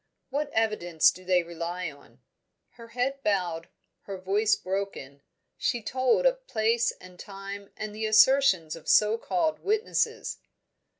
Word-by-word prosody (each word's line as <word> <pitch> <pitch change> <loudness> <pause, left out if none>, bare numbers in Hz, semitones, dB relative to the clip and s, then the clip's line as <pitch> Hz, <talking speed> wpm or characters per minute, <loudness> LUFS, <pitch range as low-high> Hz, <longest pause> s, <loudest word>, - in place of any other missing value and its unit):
"What 285 +2 -1
evidence 210 -7 +2
do 185 - -13
they 180 -1 +2
rely 170 0 -5
on?" 140 0 -20 0.5
Her 230 -1 -14
head 255 +4 -2
bowed, 175 -6 -1 0.4
her 195 -1 -6
voice 200 +4 +2
broken, 185 -8 -5 0.4
she 240 -2 -1
told 260 - +1
of - - +1
place 230 +2 +1
and 180 -1 -16
time 200 0 -8
and 215 -1 -5
the 220 +1 -2
assertions 215 - +4
of 165 - -13
so 215 +2 +4
called 320 +1 -1
witnesses. 430 +3 -1
210 Hz, 135 wpm, -27 LUFS, 180-240 Hz, 0.5 s, assertions